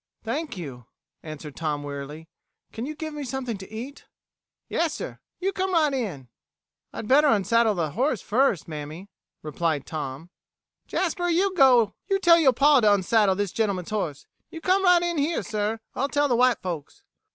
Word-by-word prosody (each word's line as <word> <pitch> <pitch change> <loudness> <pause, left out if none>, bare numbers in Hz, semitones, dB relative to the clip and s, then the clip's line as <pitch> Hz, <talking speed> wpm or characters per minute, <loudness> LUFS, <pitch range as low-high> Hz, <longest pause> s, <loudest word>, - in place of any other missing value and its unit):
"Thank 275 +2 -3
you," 130 -8 -8 0.3
answered 155 -2 -9
Tom 150 -3 -2
wearily. 145 +3 -7 0.5
"Can 230 +4 -5
you 305 - -5
give 310 0 -6
me 295 -1 -5
something 250 -5 -4
to 190 - -11
eat?" 245 +6 -8 0.6
"Yassir. 335 -2 -2 0.2
You 390 +2 -1
come 380 0 -1
right 310 -4 +3
in." 190 - -3 0.6
"I'd 220 - -7
better 290 +5 +5
unsaddle 220 -1 +3
the 160 -4 -1
horse 245 - 0
first, 225 - +1
mammy," 155 +5 -7 0.3
replied 155 -1 -1
Tom. 155 +1 -6 0.6
"Jasper, 350 -1 -1
you 370 +3 +2
tell 250 - +5 0.5
yo' 285 -5 +5
pa 285 +3 +5
to 215 -3 +4
unsaddle 200 0 +3
this 200 -1 -2
gentleman's 200 -4 -1
horse. 170 -10 -3 0.2
You 325 - -8
come 370 +4 +2
right 360 -2 +5
in 345 -3 -1
here, 310 +4 0
sir. 215 +1 -2
I'll 275 +2 -1
tell 290 0 +2
the 245 - +2
white 250 -2 +3
folks." 170 -6 -6
225 Hz, 165 wpm, -25 LUFS, -, 0.6 s, better